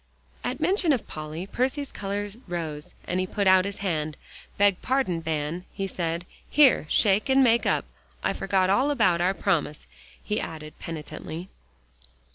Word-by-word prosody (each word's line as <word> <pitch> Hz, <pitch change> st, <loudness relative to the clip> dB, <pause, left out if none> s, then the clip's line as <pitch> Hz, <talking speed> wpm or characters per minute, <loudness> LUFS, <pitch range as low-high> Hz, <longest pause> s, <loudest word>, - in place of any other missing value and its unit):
At -, -, -2 dB
mention 365 Hz, -5 st, +3 dB
of 250 Hz, -, -2 dB
Polly, 155 Hz, +3 st, -6 dB
Percy's 265 Hz, +6 st, -1 dB
color 205 Hz, +1 st, -3 dB, 0.2 s
rose, 160 Hz, -4 st, -5 dB
and 180 Hz, -, -1 dB
he 185 Hz, -, 0 dB
put 200 Hz, +1 st, -1 dB
out 190 Hz, 0 st, +6 dB
his 200 Hz, 0 st, -4 dB
hand. 155 Hz, -4 st, -1 dB, 0.4 s
"Beg 200 Hz, -2 st, +3 dB
pardon, 255 Hz, -11 st, 0 dB
Van," 160 Hz, +2 st, -2 dB
he 195 Hz, -, -2 dB
said. 170 Hz, -2 st, -3 dB, 0.2 s
"Here, 275 Hz, -, +5 dB
shake, 205 Hz, +4 st, +3 dB
and 265 Hz, 0 st, +5 dB
make 235 Hz, -1 st, +4 dB
up. -, -, +1 dB, 0.4 s
I -, -, +1 dB
forgot 190 Hz, -1 st, +1 dB
all 255 Hz, +8 st, +3 dB
about 190 Hz, -12 st, +3 dB
our 185 Hz, +2 st, +2 dB
promise," 165 Hz, -7 st, 0 dB, 0.4 s
he 210 Hz, -, -1 dB
added 155 Hz, -1 st, -7 dB
penitently. 160 Hz, +2 st, -7 dB
185 Hz, 155 wpm, -26 LUFS, 165-215 Hz, 0.4 s, out